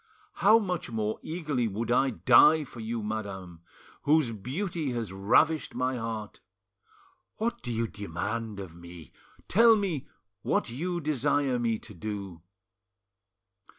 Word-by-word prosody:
How 215 Hz, +3 st, +6 dB
much 180 Hz, -, -2 dB
more 110 Hz, -2 st, -2 dB
eagerly 155 Hz, -7 st, -2 dB
would 110 Hz, +3 st, -3 dB
I 135 Hz, +2 st, +4 dB
die 125 Hz, -, +6 dB
for 125 Hz, -3 st, -11 dB
you, 115 Hz, 0 st, -3 dB
madam, 100 Hz, -5 st, -5 dB, 0.4 s
whose 150 Hz, -4 st, +3 dB
beauty 145 Hz, -, -3 dB
has 115 Hz, -5 st, -4 dB
ravished 125 Hz, +11 st, +2 dB
my 130 Hz, 0 st, 0 dB
heart! 115 Hz, -2 st, -5 dB, 1.0 s
What 235 Hz, +2 st, -2 dB
do 120 Hz, -, -5 dB
you 115 Hz, 0 st, 0 dB
demand 105 Hz, +2 st, -4 dB
of 90 Hz, -4 st, -8 dB
me? 85 Hz, -4 st, -12 dB, 0.4 s
Tell 230 Hz, +3 st, +6 dB
me 190 Hz, -10 st, -2 dB, 0.3 s
what -, -, 0 dB
you 175 Hz, +7 st, -3 dB
desire 145 Hz, -3 st, +1 dB
me 115 Hz, -2 st, 0 dB
to 105 Hz, -, -13 dB
do." 100 Hz, -3 st, -6 dB
120 Hz, 130 wpm, -28 LUFS, 105-155 Hz, 1.0 s, How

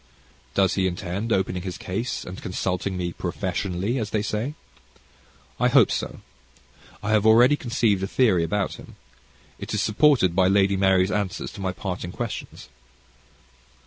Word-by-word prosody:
Does 95 Hz, -1 st, +3 dB
he 95 Hz, -1 st, +1 dB
intend 95 Hz, +5 st, -4 dB
opening 95 Hz, -2 st, 0 dB
his 90 Hz, -1 st, -5 dB
case, 115 Hz, +7 st, -3 dB
and 90 Hz, +1 st, -8 dB
consulting 90 Hz, +1 st, -2 dB
me 90 Hz, -1 st, -3 dB
"professionally," 95 Hz, +5 st, -2 dB
as 110 Hz, -2 st, -3 dB
they 105 Hz, 0 st, -1 dB
say? 110 Hz, +7 st, -3 dB, 1.0 s
I 125 Hz, -, +4 dB
hope 125 Hz, -3 st, +5 dB
so. -, -, -3 dB, 0.8 s
I 105 Hz, -, -1 dB
have 110 Hz, -2 st, +3 dB
already 120 Hz, +6 st, +6 dB
conceived 115 Hz, -7 st, 0 dB
a 95 Hz, -, -1 dB
theory 100 Hz, -8 st, +3 dB
about 95 Hz, +4 st, -1 dB
him. -, -, -13 dB, 0.6 s
It -, -, -4 dB
is 105 Hz, -, +1 dB
supported 110 Hz, -, +3 dB
by 95 Hz, -1 st, +4 dB
Lady 100 Hz, 0 st, +3 dB
Mary's 95 Hz, 0 st, +3 dB
answers 100 Hz, -1 st, -2 dB
to 100 Hz, -, -9 dB
my 95 Hz, -1 st, -1 dB
parting 90 Hz, -1 st, -5 dB
questions. 105 Hz, -, -6 dB
100 Hz, 150 wpm, -24 LUFS, 90-110 Hz, 1.0 s, already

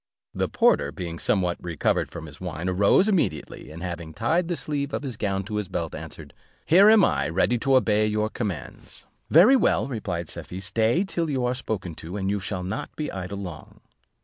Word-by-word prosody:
The -, -, -1 dB
porter, -, -, +3 dB
being 85 Hz, -2 st, -6 dB
somewhat 90 Hz, -4 st, 0 dB
recovered 85 Hz, -4 st, 0 dB
from 80 Hz, -, -8 dB
his 75 Hz, +1 st, -12 dB
wine, 90 Hz, -1 st, -4 dB
arose 100 Hz, -, +4 dB
immediately, 160 Hz, -, -1 dB
and 80 Hz, +3 st, -9 dB
having 85 Hz, -3 st, -6 dB
tied 165 Hz, +9 st, +1 dB
the 175 Hz, -, -1 dB
sleeve 140 Hz, 0 st, -3 dB
of -, -, -4 dB
his 130 Hz, -4 st, -5 dB
gown 100 Hz, -2 st, -1 dB
to 105 Hz, +2 st, -4 dB
his 105 Hz, -2 st, -2 dB
belt, 85 Hz, -2 st, -3 dB
answered, -, -, -9 dB, 0.3 s
"Here 195 Hz, +6 st, +7 dB
am 215 Hz, -5 st, +7 dB
I, -, -, 0 dB
ready 115 Hz, +8 st, +1 dB
to 135 Hz, +2 st, +2 dB
obey 110 Hz, -4 st, +3 dB
your 105 Hz, 0 st, 0 dB
commands." 95 Hz, -, -6 dB, 0.2 s
"Very 195 Hz, -, +7 dB
well," 255 Hz, -, +2 dB
replied 95 Hz, -, -4 dB
Safie, 90 Hz, -, -7 dB
"stay 110 Hz, -, +1 dB
till 170 Hz, -4 st, -2 dB
you 130 Hz, -3 st, 0 dB
are 125 Hz, -, +1 dB
spoken 105 Hz, -8 st, -4 dB
to; 85 Hz, +5 st, -6 dB
and 95 Hz, -1 st, -1 dB
you 100 Hz, -, 0 dB
shall 95 Hz, -1 st, -4 dB
not 100 Hz, +11 st, -4 dB
be 150 Hz, -, -3 dB
idle 95 Hz, +1 st, -5 dB
long." 90 Hz, -6 st, -8 dB
105 Hz, 200 wpm, -25 LUFS, 90-135 Hz, 0.3 s, Here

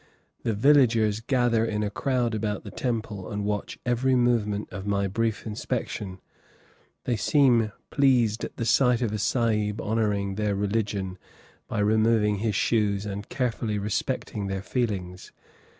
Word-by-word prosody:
The 115 Hz, -, -1 dB
villagers 115 Hz, -4 st, +4 dB
gather 120 Hz, -2 st, +2 dB
in 105 Hz, -2 st, -1 dB
a 105 Hz, -, -2 dB
crowd 125 Hz, 0 st, 0 dB
about 105 Hz, -2 st, -2 dB
the 100 Hz, -, -8 dB
temple 110 Hz, -4 st, -3 dB
and 105 Hz, -1 st, -3 dB
watch 105 Hz, -1 st, -3 dB
every 125 Hz, +2 st, +2 dB
movement 115 Hz, -4 st, +1 dB
of 95 Hz, +2 st, -6 dB
my 100 Hz, -1 st, +1 dB
brief 115 Hz, +3 st, -1 dB
inspection; 105 Hz, -3 st, -4 dB, 0.8 s
they 120 Hz, -, 0 dB
seem 120 Hz, -2 st, +3 dB, 0.2 s
pleased 125 Hz, -6 st, +3 dB
at -, -, -6 dB
the 115 Hz, -, -2 dB
sight 125 Hz, +1 st, +3 dB
of 115 Hz, -, 0 dB
a 105 Hz, -, -2 dB
Sahib 105 Hz, -2 st, 0 dB
honoring 105 Hz, -3 st, 0 dB
their 105 Hz, -1 st, 0 dB
religion 100 Hz, -2 st, -2 dB, 0.5 s
by -, -, -4 dB
removing 110 Hz, 0 st, +3 dB
his 105 Hz, 0 st, -1 dB
shoes 105 Hz, -2 st, +1 dB
and 100 Hz, 0 st, -5 dB
carefully 115 Hz, -5 st, -1 dB
respecting 100 Hz, 0 st, -2 dB
their 95 Hz, 0 st, -3 dB
feelings. 95 Hz, -7 st, -3 dB
110 Hz, 145 wpm, -26 LUFS, 100-115 Hz, 0.8 s, villagers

